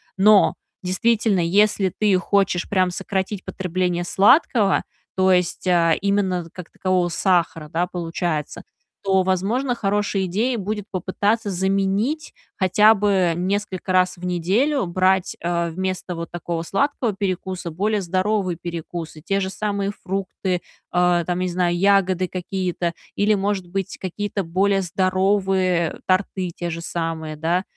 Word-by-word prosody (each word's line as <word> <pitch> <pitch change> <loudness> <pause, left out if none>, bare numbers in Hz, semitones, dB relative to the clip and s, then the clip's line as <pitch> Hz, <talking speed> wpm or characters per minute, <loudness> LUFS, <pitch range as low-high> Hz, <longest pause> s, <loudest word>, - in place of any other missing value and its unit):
Но, 205 +1 +5 0.3
действительно, 210 +2 +1
если 195 +2 +2
ты 210 -3 +3
хочешь 195 -1 +1
прям 185 -2 +2
сократить 190 +1 -3
потребление 180 -1 -2
сладкого, 205 - +4 0.3
то 190 0 +4
есть, 180 0 +1
э, 170 -3 +3
именно 190 -4 0
как 180 -2 -9
такового 185 -2 0
сахара, 170 -3 +1
да, 175 +3 -1
получается, 165 -3 -3 0.4
то, 190 -1 +3
возможно, 210 +8 0
хорошей 205 -3 0
идеей 225 +7 0
будет 210 +1 -3
попытаться 205 +4 0
заменить, 195 - 0 0.2
хотя 210 +3 +5
бы 195 -4 +2
несколько 190 0 -2
раз 185 -1 +3
в 180 - -8
неделю 195 - +1
брать, 185 +1 +1
э, 170 0 -1
вместо 185 +1 -3
вот 170 0 -6
такого 170 -1 -4
сладкого 240 - 0
перекуса 185 -3 -3
более 205 +5 0
здоровые 185 0 0
перекусы, 170 -2 -6
те 195 +4 0
же 190 -1 -2
самые 200 0 -2
фрукты, 190 -1 -2 0.3
э, 175 -1 +3
там, 180 0 -1
не 185 - 0
знаю, 175 -1 0
ягоды 190 -1 +3
какие-то 180 -1 -3 0.2
или, 205 +1 +3
может 200 -2 -1
быть, 195 +1 -4
какие-то 200 +2 -3
более 195 +3 +1
здоровые 185 -1 +1
торты 185 -1 0
те 175 -1 -4
же 165 0 -5
самые, 165 -2 -4
да? 170 +4 0
185 Hz, 135 wpm, -22 LUFS, 175-200 Hz, 0.4 s, Но